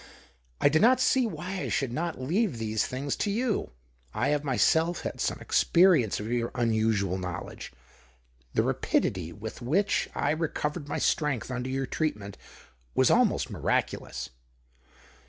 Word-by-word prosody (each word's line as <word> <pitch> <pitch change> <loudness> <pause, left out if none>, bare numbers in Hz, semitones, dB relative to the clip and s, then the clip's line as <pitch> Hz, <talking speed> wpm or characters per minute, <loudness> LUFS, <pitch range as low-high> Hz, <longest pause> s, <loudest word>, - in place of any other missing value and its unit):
I - - +5
do 155 +2 +3
not 250 +5 +5
see 255 -1 +3
/hy - - -6
I 185 +1 -4
should 130 -4 -1
not 165 +2 -3
leave 170 - 0
these 110 -1 -1
things 135 +2 -3
to 210 - -1
you. 225 +2 -1 0.5
have 150 0 +1
myself 160 +5 +2
had - - -5
some - - 0
experience 170 - +3
of 105 +3 -5
your 120 -1 0
musual 110 -5 +1
knowledge 90 -1 -6 0.4
— - - -36
the - - +3
rapidity 90 -4 0
with 110 +5 -8
which 175 +12 +1
recovered 155 -1 -1
my 145 - -2
strength 140 -5 0
under 125 0 -3
your 135 +1 -1
treat 155 0 -1
aent 100 -1 -9 0.6
was - - +4
almost - - +2
miraculous. - - -2
135 Hz, 145 wpm, -28 LUFS, 110-170 Hz, 0.6 s, I